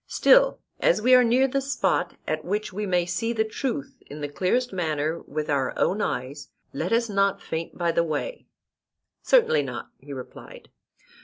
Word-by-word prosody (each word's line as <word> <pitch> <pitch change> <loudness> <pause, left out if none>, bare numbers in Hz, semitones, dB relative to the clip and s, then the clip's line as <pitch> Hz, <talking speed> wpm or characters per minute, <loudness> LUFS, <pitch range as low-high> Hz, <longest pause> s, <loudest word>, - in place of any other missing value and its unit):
Still, - - +4 0.2
as - - +3
we 250 +4 +4
are 250 0 +8
near 250 +3 +3
the 275 +1 -1
spot 275 +1 0
at 155 0 -2
which 205 +2 -3
we 210 +2 -3
may 180 -2 +2
see 225 +7 -2
the 220 -1 +1
truth 220 - -4
in 145 - -9
the 145 - -3
clearest 195 - 0
manner 160 -2 -1
with 150 -1 -3
our 135 -3 -1
own 205 +3 +1
eyes, 135 -1 -4 0.2
let 160 +5 -3
us 230 +1 +2
not 200 -2 +1
faint 165 +1 -5
by 170 -1 +1
the 170 +1 +2
way. 320 - -4 0.7
Certainly 465 - +4
not, 130 -3 -6
he 140 +2 -12
replied. 130 -2 -10
185 Hz, 175 wpm, -25 LUFS, 155-235 Hz, 0.7 s, are